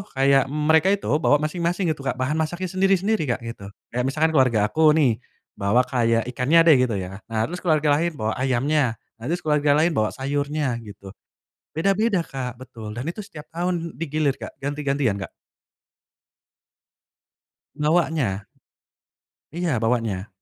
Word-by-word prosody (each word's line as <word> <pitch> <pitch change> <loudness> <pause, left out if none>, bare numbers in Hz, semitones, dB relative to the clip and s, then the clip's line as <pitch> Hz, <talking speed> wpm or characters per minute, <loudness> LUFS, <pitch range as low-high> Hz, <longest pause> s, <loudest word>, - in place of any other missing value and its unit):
kayak 135 0 +4
mereka 155 +4 +2
itu 200 -5 +1
bawa 145 - +4
masing-masing 170 +2 0
gitu 155 - -5
Kak 125 - 0
bahan 130 +5 -1
masaknya 175 +3 -2
sendiri-sendiri 195 -1 +1
Kak 120 - -12
gitu 115 -4 -7 0.2
kayak 125 +1 -1
misalkan 155 +3 +1
keluarga 125 -5 +4
aku 155 -1 +5
nih, 125 -8 +2 0.4
bawa 105 +6 +3
kayak 115 -3 +1
ikannya 145 +7 +4
deh 155 - +8
gitu 110 - -2
ya 95 +1 -5
nah 110 -1 -1
terus 180 +2 -6
keluarga 155 -3 +2
lain 170 -1 -1
bawa 110 -3 -2
ayamnya, 130 -1 +1 0.2
nah 115 - -9
terus 175 +3 -2
keluarga 150 -1 +3
lain 160 +3 +3
bawa 110 -8 +1
sayurnya 140 -1 -2
gitu, 100 -3 -11 0.6
beda-beda 195 +2 +1
Kak 125 -4 -5
betul 115 -4 -9
dan 120 - -4
itu 215 - -11
setiap 155 -7 -9
tahun 170 0 -2
di 165 - -1
gilir 145 -2 0
Kak - - -8
ganti-gantian 140 -7 -1
Kak 95 - -6 2.4
bawanya. 150 - 0 1.1
Iya 165 -8 -1
bawanya. 115 -4 -1
145 Hz, 150 wpm, -23 LUFS, 120-160 Hz, 2.4 s, deh